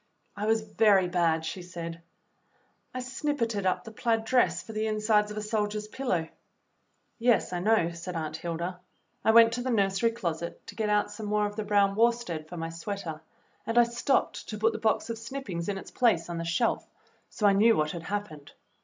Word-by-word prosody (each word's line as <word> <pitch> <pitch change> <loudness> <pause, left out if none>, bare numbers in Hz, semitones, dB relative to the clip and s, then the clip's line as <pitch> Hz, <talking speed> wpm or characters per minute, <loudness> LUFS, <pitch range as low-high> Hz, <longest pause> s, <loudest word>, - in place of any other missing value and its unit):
"I 210 +1 -3
was 220 0 +3
very 205 -4 +3
bad," 165 -3 +1
she 180 +3 -4
said. 170 -2 -7 0.9
"I 255 - -4
snippited 250 -6 -1
up 185 - 0
the 225 - -9
plaid 225 0 0
dress 250 +1 +2
for 225 - -9
the 215 +1 -1
insides 215 -1 +2
of 210 - -7
a 215 - -3
soldier's 210 -1 -2
pillow." 215 -9 -1 0.9
"Yes, 230 -5 +2
I 175 - -1
know," 195 -3 +2
said 170 +1 -7
Aunt 155 -1 -3
Hilda. 170 +2 -4 0.4
"I - - +2
went 230 0 +7
to 245 - -2
the 260 - -2
nursery 200 -1 +2
closet 170 -7 -4
to - - -9
get 210 -2 +1
some 215 -2 -6
more 210 0 +1
of 205 0 -4
the 215 - -2
brown 200 -1 +3
worsted 225 -9 +1
for 175 - -7
my 165 0 -3
sweater, 165 -2 -5 0.5
and 230 +1 -1
I 240 - +9
stopped 235 +3 0
to 215 - -4
put 225 +2 +2
the - - -4
box 220 +1 +1
of 225 - -5
snip 265 +4 -6
pings 170 -2 -4
in 200 - -2
its - - -9
place 175 -9 +2
on 170 - -3
the 165 - -3
shelf, 230 +8 0 0.4
so 210 - -2
I 200 - +6
knew 225 +3 +5
what 155 0 +1
had 170 - -6
happened. 170 -5 -5
210 Hz, 205 wpm, -28 LUFS, 175-225 Hz, 0.9 s, I